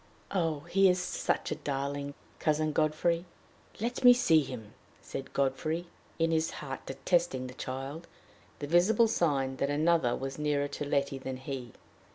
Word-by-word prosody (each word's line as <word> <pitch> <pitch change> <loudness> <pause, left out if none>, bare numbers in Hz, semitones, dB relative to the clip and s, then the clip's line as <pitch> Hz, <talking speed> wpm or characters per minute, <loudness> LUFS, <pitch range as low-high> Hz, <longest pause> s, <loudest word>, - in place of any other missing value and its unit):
Oh, 165 -6 0
he 195 +5 +4
is 180 - +3
such 180 0 -1
a - - 0
darling, 140 0 -3 0.2
Cousin 155 0 +1
Godfrey!" 155 +3 +1 0.6
"Let 240 +4 -2
me 245 0 +10
see 165 -10 +5
him," 115 -6 -7 0.3
said 135 0 -7
Godfrey, 145 +5 0 0.3
in 165 0 +2
his 160 0 +2
heart 135 -3 -6
detesting 135 0 0
the 125 - -7
child 135 +6 -6 0.5
the 145 - -4
visible 185 +9 +4
sign 135 -10 +1
that 140 - 0
another 155 -3 +2
was 135 +1 -5
nearer 145 -1 +1
to 145 - -4
Letty 140 -1 0
than 130 0 -5
he. 130 -3 -6
145 Hz, 155 wpm, -30 LUFS, 135-170 Hz, 0.6 s, me